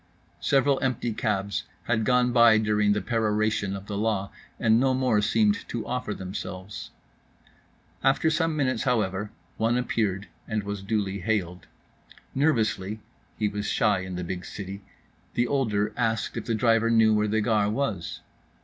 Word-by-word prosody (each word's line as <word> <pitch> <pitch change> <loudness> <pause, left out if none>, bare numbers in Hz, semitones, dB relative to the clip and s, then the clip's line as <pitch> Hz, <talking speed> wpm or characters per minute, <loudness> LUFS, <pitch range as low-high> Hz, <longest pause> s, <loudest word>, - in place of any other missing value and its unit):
Several 135 0 +2
empty 125 -3 -1
cabs 100 -3 -1 0.2
had 115 -2 0
gone 125 0 +3
by 115 -2 +7
during 105 -1 +2
the 105 -2 -2
peroration 110 -3 0
of 100 0 -8
the 100 -1 -4
law, 105 -3 -1 0.3
and 110 +1 +4
no 130 0 +2
more 125 -5 +2
seemed 205 - +2
to 115 - -3
offer 125 -3 -3
themselves. 95 +1 -6 1.1
After 140 +4 +3
some 160 0 +1
minutes, 130 -5 0
however, 105 -5 0 0.3
one 115 +2 +2
appeared 105 -5 -1 0.2
and 110 -2 -1
was 100 0 -4
duly 100 -1 -1
hailed. 90 -4 -2 0.7
Nervously 110 -8 +1 0.4
(he 105 - +1
was 105 0 -3
shy 105 -3 +2
in 95 0 -5
the 90 - -3
big 90 +1 -4
city) 100 0 -7 0.5
the 120 - +2
older 110 -6 0
asked 115 -2 -1
if 115 - -4
the 115 - 0
driver 115 +1 +3
knew 110 -1 +5
where 105 0 +2
the 110 +1 +1
Gare 105 -2 +2
was. 110 -7 -2
110 Hz, 155 wpm, -26 LUFS, 100-120 Hz, 1.1 s, by